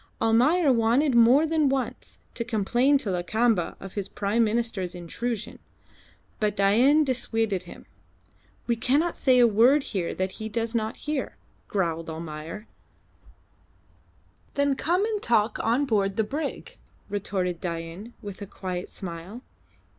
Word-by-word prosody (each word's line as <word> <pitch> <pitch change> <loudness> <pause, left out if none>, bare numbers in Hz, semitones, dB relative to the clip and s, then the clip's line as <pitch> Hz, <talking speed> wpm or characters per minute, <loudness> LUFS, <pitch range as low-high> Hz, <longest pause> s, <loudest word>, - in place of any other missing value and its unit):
Almayer 260 +8 +4
wanted 245 +5 +2
more 240 +6 +6
than 315 -3 +2
once 265 -1 -3 0.2
to 235 - -3
complain 240 +5 +2
to 245 -8 -3
Lakamba 185 +2 +1
of 195 - -9
his 200 -2 -4
Prime 210 +3 +1
Minister's 215 -5 -1
intrusion, 215 +5 -4 0.8
but 210 -1 0
Dain 240 +10 +5
dissuaded 225 -7 -1
him. - - -12 0.8
"We 235 - +1
cannot 285 +9 +1
say 260 -2 +3
a 245 - +7
word 240 +6 +4
here 190 -10 -3
that 185 0 -2
he 220 +2 -6
does 230 +1 -2
not 220 -1 -2
hear," 300 -2 -3 0.3
growled 165 -4 -1
Almayer. 160 +5 -7 1.9
"Then 285 0 +2
come 350 +8 +1
and 430 -2 -2
talk 220 -2 +1
on 240 +6 +1
board 200 -5 0
the 220 - +3
brig," 285 +7 -5 0.3
retorted 190 -3 -2
Dain, 170 +6 -6
with 205 -1 -8
a 200 - -6
quiet 180 -2 -5
smile. 185 +6 -8
225 Hz, 135 wpm, -26 LUFS, 195-255 Hz, 1.9 s, a